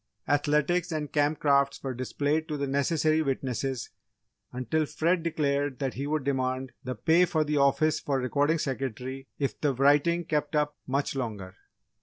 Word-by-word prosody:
Athletics 150 +5 +1
and 150 -2 -3
Camp 150 +1 +2
Crafts 140 -1 +2
were 135 -1 -2
displayed 145 +5 -1
to 150 - -3
the 140 - -1
necessary 155 +3 +1
witnesses 135 -3 -2 0.6
until 130 +5 -1
Fred 170 +4 +1
declared 145 -4 0
that 135 -3 -2
he 140 +2 -4
would 155 -1 -1
demand 130 -1 -1
the 130 0 -4
pay 165 +9 +4
for 160 -3 +1
the 150 0 -1
office 140 +3 +3
for 140 -2 -1
Recording 145 +5 +1
Secretary 130 -1 -4
if 140 -2 -2
the 145 -3 +1
writing 145 +6 +3
kept 150 0 -1
up 150 0 +1
much 140 +2 -1
longer. 105 -8 -4
140 Hz, 160 wpm, -28 LUFS, 135-155 Hz, 0.6 s, pay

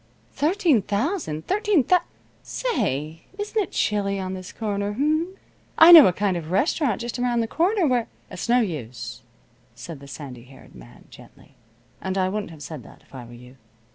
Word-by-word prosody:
"Thirteen 320 - +2
thousand! 205 - -2
Thirteen 415 - +2
thous 360 +6 +3 0.4
Say, 165 - -3
isn't 425 +1 -1
it 385 - -5
chilly 200 -1 0
on 185 0 -4
this 185 0 -8
corner, 205 -2 -3
h'm? 310 - 0 0.4
I 325 +2 +9
know 325 -4 +11
a - - +3
kind 195 +1 -1
of 165 -3 -5
a - - -9
restaurant 245 - +1
just 240 +1 -5
around 245 -1 +1
the 225 - -2
corner 365 - +1
where 250 -5 +1
" - - -34
"It's - - -6
no 245 +1 +5
use," 140 - -5 0.5
said 165 -4 -9
the 140 - -13
sandy 130 -4 -9
haired 130 +1 -17
man, - - -15
gently. - - -17 0.5
"And 190 0 -3
I 185 -1 +1
wouldn't 210 0 -4
have 155 -3 -11
said 150 -1 -7
that, - - -16
if - - -27
I 125 -3 -8
were 120 - -13
you. 125 +2 -14
205 Hz, 190 wpm, -23 LUFS, -, 0.5 s, know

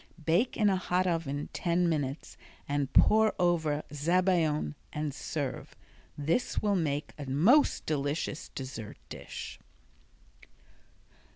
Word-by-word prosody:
Bake 180 +10 +2
in 215 - +3
a 195 -2 +3
hot 185 0 0
oven 160 -5 -2
ten 175 0 +1
minutes 145 -3 -2 0.3
and 145 -1 -1
pour 220 0 +5
over 160 -4 +1
zabaione 160 - +1 0.2
and 150 -1 -3
serve. 140 -2 -4 0.4
This 160 - 0
will 205 -1 +1
make 150 -5 -1
a 145 - -6
most 205 - +4
delicious 145 +1 -2
dessert 130 -5 -6
dish. - - -8
160 Hz, 110 wpm, -30 LUFS, 145-180 Hz, 0.4 s, pour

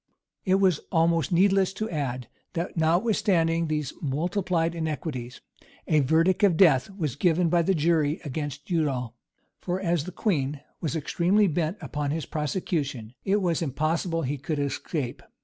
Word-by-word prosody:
It 190 -1 +3
is 190 -5 +3
almost 165 0 +2
needless 190 +1 +3
to 215 +3 -3
add, 130 - -3 0.3
that 170 +2 -3
notwithstanding 170 -1 +2
these 150 -3 -2
multiplied 170 +3 0
iniquities, 150 -6 -4 0.5
a 155 - +4
verdict 165 - +3
of 185 -5 +4
death 150 -8 +5
was 165 - -3
given 175 -1 +2
by 170 +1 +3
the 190 +3 +1
jury 155 -1 +2
against 145 0 -5
Udal; 135 -8 0 0.5
for, 180 +1 -2
as 170 -5 0
the 185 - -6
queen 150 -8 -1 0.2
was 160 -1 -2
extremely 175 +6 +2
bent 165 +1 -1
upon 150 -1 -3
his 155 +2 -2
prosecution, 145 - -3
it 200 +1 +2
was 170 -2 +1
impossible 165 +3 -1
he 140 +2 -2
could 150 +3 -3
escape. 140 -1 -3
165 Hz, 150 wpm, -26 LUFS, 145-180 Hz, 0.5 s, death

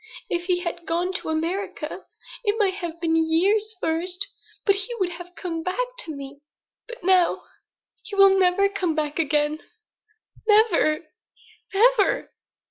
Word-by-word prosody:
If 345 0 -1
he 360 -1 +1
had 340 -1 -5
gone 350 +3 0
to 375 - -2
America 335 +6 -3 0.4
it 415 -1 +2
might 400 -4 +2
have 345 -3 -6
been 325 -1 +1
years 385 +7 +2
first 360 +4 -1 0.4
but 400 - +5
he 405 +5 -4
would 365 -2 0
have 355 +1 -10
come 335 -3 -4
back 370 +9 -1
to 320 -11 -4
me. 280 0 -9 0.5
But 485 0 -10
now 365 -1 +3 0.6
he 410 - -8
will 390 -1 +7
never 375 +2 +4
come 375 -5 -1
back 300 0 -2
again; 300 0 +1 0.9
never 415 -8 +4 0.7
never!" 435 0 +3
360 Hz, 140 wpm, -24 LUFS, 325-400 Hz, 0.9 s, will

